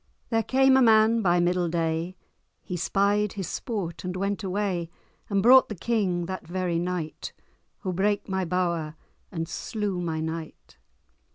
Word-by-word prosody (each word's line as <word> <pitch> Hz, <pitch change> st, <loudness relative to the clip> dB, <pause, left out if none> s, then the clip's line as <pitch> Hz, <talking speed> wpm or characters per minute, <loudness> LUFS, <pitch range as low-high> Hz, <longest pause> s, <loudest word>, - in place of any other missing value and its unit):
There 225 Hz, 0 st, +3 dB
came 265 Hz, +2 st, +4 dB
a -, -, +5 dB
man 225 Hz, -1 st, +5 dB
by 175 Hz, -3 st, +3 dB
middle 175 Hz, 0 st, +1 dB
day, 165 Hz, +2 st, -1 dB, 0.5 s
He 180 Hz, -, -5 dB
spied 200 Hz, +3 st, +1 dB
his 195 Hz, -4 st, -4 dB
sport, 200 Hz, -9 st, -4 dB
and 180 Hz, 0 st, -4 dB
went 200 Hz, +2 st, -2 dB
away; 190 Hz, -3 st, -2 dB, 0.4 s
And 200 Hz, -2 st, +1 dB
brought 255 Hz, +3 st, +7 dB
the 215 Hz, -, -4 dB
King 190 Hz, -4 st, 0 dB
that 185 Hz, -1 st, -6 dB
very 175 Hz, -1 st, -1 dB
night, 175 Hz, -3 st, -4 dB, 0.5 s
Who 185 Hz, -2 st, -3 dB
brake 205 Hz, +2 st, 0 dB
my 190 Hz, -1 st, -1 dB
bower, 170 Hz, -3 st, -1 dB, 0.4 s
and 165 Hz, -2 st, -3 dB
slew 205 Hz, -1 st, -3 dB
my 165 Hz, -2 st, -2 dB
knight. 160 Hz, 0 st, -6 dB
185 Hz, 155 wpm, -26 LUFS, 170-210 Hz, 0.5 s, brought